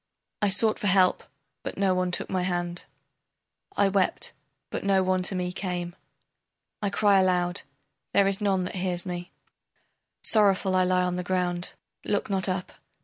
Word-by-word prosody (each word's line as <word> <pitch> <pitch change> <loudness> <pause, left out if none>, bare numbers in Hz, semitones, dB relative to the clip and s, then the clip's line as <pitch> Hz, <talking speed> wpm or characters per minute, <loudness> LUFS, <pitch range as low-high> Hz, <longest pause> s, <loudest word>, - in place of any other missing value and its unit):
I 205 - +3
sought 215 +3 +3
for 205 - -1
help, 185 -1 +4 0.4
but - - -6
no 195 -1 +2
one 185 0 0
took 180 - -1
my 185 -1 -1
hand, 175 -1 -2 0.9
I 200 - +4
wept, 195 -1 0 0.4
but - - -4
no 195 -1 +3
one 185 0 +1
to 190 +1 0
me 180 0 -2
came, 180 -1 -4 0.9
I 205 - 0
cry 200 0 +4
aloud, 180 -1 +1 0.5
there 200 0 +4
is 195 +1 +1
none 195 -3 +1
that 180 - -5
hears 180 -1 -2
me, 175 -1 -5 0.9
Sorrowful 195 -3 +4
I 185 - +4
lie 180 0 +2
on 180 0 -1
the 180 - -2
ground, 180 -1 -1 0.3
look 205 0 -1
not 190 0 +1
up. 185 0 -3
185 Hz, 165 wpm, -26 LUFS, 180-195 Hz, 0.9 s, help